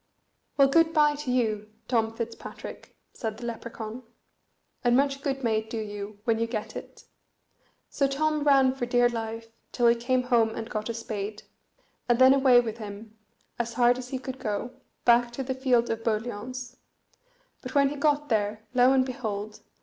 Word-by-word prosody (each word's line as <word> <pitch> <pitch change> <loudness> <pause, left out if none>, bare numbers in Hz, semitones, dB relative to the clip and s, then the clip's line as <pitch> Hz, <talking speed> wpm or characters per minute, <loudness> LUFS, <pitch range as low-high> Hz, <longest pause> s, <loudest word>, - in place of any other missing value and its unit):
"Well, 275 -1 +7
good 325 +3 +3
bye 300 -2 +4
to 290 -3 -3
you 215 -4 0 0.2
Tom 225 -2 +1
Fitzpatrick," 230 0 -8 0.2
said 220 -2 -4
the 240 - -7
Lepracaun; 230 0 -6 0.8
"and 240 0 +4
much 275 0 +1
good 270 -1 -2
may 220 -2 +2
it 220 0 -10
do 230 - -4
you 205 -1 -6
when 225 -1 +1
you 230 - 0
get 220 -2 -5
it." - - -9 0.9
So 275 - +2
Tom 305 +2 0
ran 270 -3 +5
for 245 -2 -3
dear 245 0 +4
life, 225 -1 -5 0.2
till 240 - 0
he 235 - +7
came 250 +2 0
home 230 -3 +2
and 225 0 -6
got 215 0 -3
a 230 - -3
spade, 215 -2 -5 0.7
and 240 - +4
then 260 +1 +7
away 265 -3 +6
with 230 -1 -3
him, 210 +1 -9 0.4
as 235 0 -2
hard 245 +1 +3
as 250 0 -8
he 260 - -2
could 260 0 -7
go, 215 +1 -3 0.3
back 240 0 +5
to 270 - -3
the 260 0 -2
field 255 -2 +2
of 225 0 -3
boliauns; 240 +3 -3 0.8
but 255 +1 -8
when 280 -1 +5
he 290 - -5
got 295 0 +1
there, 215 -1 0
lo 250 +1 +5
and 260 -1 +3
behold! 215 -5 -5
240 Hz, 180 wpm, -27 LUFS, 220-260 Hz, 0.9 s, Well